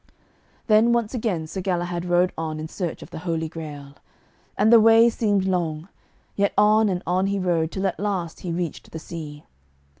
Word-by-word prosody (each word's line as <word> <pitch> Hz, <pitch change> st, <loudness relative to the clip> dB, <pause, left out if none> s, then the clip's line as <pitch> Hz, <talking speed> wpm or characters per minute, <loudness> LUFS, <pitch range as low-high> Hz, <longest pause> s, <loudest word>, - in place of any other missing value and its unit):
Then 220 Hz, +2 st, +4 dB
once 235 Hz, -1 st, 0 dB
again 215 Hz, -10 st, -2 dB
Sir 190 Hz, +4 st, -5 dB
Galahad 175 Hz, -2 st, -2 dB
rode 175 Hz, +1 st, +2 dB
on 155 Hz, -1 st, -4 dB
in 155 Hz, -, -5 dB
search 175 Hz, 0 st, -5 dB
of -, -, -14 dB
the -, -, -7 dB
Holy 165 Hz, -1 st, -2 dB
Grail. 150 Hz, -3 st, -9 dB, 0.6 s
And 220 Hz, +2 st, +4 dB
the 230 Hz, -, +9 dB
way 225 Hz, +1 st, +6 dB
seemed 205 Hz, -4 st, 0 dB
long, 170 Hz, -2 st, -2 dB, 0.5 s
yet 200 Hz, 0 st, +1 dB
on 215 Hz, +1 st, +4 dB
and 180 Hz, -1 st, -2 dB
on 185 Hz, +3 st, +1 dB
he 200 Hz, 0 st, -1 dB
rode, 170 Hz, -4 st, 0 dB
till 190 Hz, 0 st, -3 dB
at 190 Hz, -, -2 dB
last 185 Hz, -5 st, -3 dB
he 175 Hz, -, -5 dB
reached 170 Hz, -2 st, -4 dB
the -, -, -6 dB
sea. 155 Hz, -2 st, -8 dB
180 Hz, 185 wpm, -23 LUFS, 160-205 Hz, 0.6 s, the